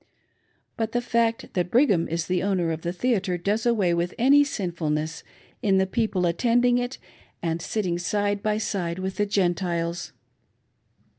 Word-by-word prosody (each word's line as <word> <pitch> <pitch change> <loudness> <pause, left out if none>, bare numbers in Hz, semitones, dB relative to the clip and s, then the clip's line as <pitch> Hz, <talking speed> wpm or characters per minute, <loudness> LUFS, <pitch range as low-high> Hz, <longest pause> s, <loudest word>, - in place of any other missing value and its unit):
But 225 -1 -2
the 240 - +2
fact 235 -1 0
that 180 -2 0
Brigham 215 - +3
is 165 +1 -2
the 180 +1 0
owner 185 -4 0
of 160 0 -4
the 170 - -2
theatre 195 -2 0
does 210 +6 0
away 205 -7 +2
with 170 +1 -1
any 280 +4 +6
sin^ 195 -11 -3
fulness 155 0 -2 0.4
in 195 -2 +3
the 190 - +3
people 195 -3 0
attending 245 +7 +3
it 245 +1 -3 0.5
and 165 0 -1
sitting 180 -3 -1
side 205 +3 0
by 210 0 0
side 180 -5 -2
with 190 0 -4
the 205 -1 +1
Gentiles. 175 -3 -1
190 Hz, 160 wpm, -25 LUFS, 170-225 Hz, 0.5 s, any